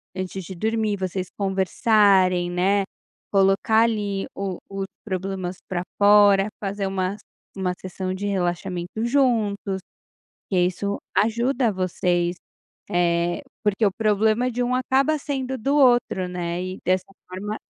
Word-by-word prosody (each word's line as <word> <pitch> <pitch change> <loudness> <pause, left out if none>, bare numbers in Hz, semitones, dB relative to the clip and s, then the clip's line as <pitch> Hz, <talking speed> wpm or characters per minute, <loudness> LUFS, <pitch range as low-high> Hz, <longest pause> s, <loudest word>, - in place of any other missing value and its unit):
antes 185 0 -4
de 185 +2 -8
dormir, 220 +2 0
vocês 185 -1 -3
conversarem, 190 -2 +3
né, 195 +3 +2 0.5
colocar 195 +3 +4
ali 205 -4 -1
o 195 -2 -3
os 195 -1 -4 0.2
problemas 190 -2 -3
pra 175 -1 -2
fora, 205 -1 +6
fazer 200 -1 -2
um 195 - -5 0.6
uma 185 -2 -1
sessão 185 0 -4
de 200 +2 -3
relaxamento 180 +1 -2
juntos, 220 -7 +1 0.7
porque 185 -3 +2
isso 200 +3 -2 0.2
ajuda 235 +3 +2
vocês, 180 -2 0 0.6
eh, 175 0 +1 0.2
porque 210 +1 +1
o 195 - +1
problema 220 +3 +2
de 245 +1 -2
um 245 +1 0
acaba 270 +4 +2
sendo 265 -2 -3
do 275 +5 0
outro, 240 -8 +3
né, 175 0 -3
e 185 +1 -5
dessa 185 0 +1 0.2
forma 205 +4 -5
195 Hz, 130 wpm, -23 LUFS, 185-220 Hz, 0.7 s, fora